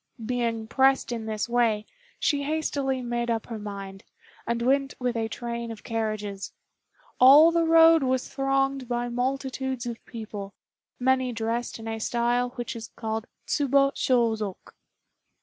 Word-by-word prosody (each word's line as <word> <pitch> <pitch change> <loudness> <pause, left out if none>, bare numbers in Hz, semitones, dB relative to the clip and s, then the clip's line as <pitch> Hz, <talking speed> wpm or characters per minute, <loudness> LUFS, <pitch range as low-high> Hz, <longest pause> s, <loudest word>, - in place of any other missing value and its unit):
Being 230 -2 -1
pressed 265 +2 +3
in 225 -2 -4
this 215 0 -2
way, 230 -3 +1 0.3
she 285 -2 +1
hastily 280 -3 -1
made 240 0 -2
up 225 -1 -1
her 225 -2 -6
mind, 195 -2 -7 0.4
and 235 0 0
went 270 +3 +1
with 250 -1 -1
a 225 -1 -1
train 235 0 -5
of 225 -2 -8
carriages. 215 -4 -3 0.7
All 290 +6 +9
the 335 0 +2
road 325 0 +7
was 260 -1 0
thronged 270 -1 0
by 240 0 -2
multitudes 260 +1 -2
of 235 -1 -6
people, 210 -4 -7 0.4
many 260 0 +2
dressed 230 +1 -2
in 225 0 -9
a 225 0 -3
style 240 +2 0
which 240 -1 -4
is 225 -1 -7
called 220 0 -3 0.2
Tsubo 275 -1 +3
Shôzok. 225 -8 0
240 Hz, 145 wpm, -26 LUFS, 225-265 Hz, 0.7 s, All